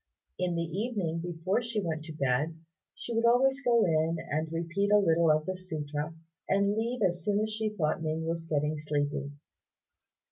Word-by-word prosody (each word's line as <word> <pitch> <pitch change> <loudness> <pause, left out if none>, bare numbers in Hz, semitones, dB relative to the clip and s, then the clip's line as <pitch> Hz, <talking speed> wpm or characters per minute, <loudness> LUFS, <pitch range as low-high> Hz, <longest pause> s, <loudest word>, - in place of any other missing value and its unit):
In 180 -1 0
the 170 - 0
evening 180 -1 -2
before 175 +5 -1
she 235 -2 -1
went 160 -2 -2
to 160 - -7
bed, 145 +3 0 0.4
she 235 - -5
would 230 0 +1
always 265 +3 +4
go 235 -3 +4
in 160 0 +2
and 155 +2 -1
repeat 170 +5 -1
a 210 - +7
little 170 -4 +4
of 155 0 +3
the 185 - -2
sutra, 155 -3 -4 0.3
and 200 +1 +3
leave 230 +1 -1
as 175 -2 +1
soon 205 +2 +1
as 215 0 -1
she 220 0 0
thought 155 -3 0
Ning 160 0 -2
was 165 0 -2
getting 150 0 0
sleepy. 145 -1 -1
170 Hz, 180 wpm, -30 LUFS, 155-205 Hz, 0.4 s, a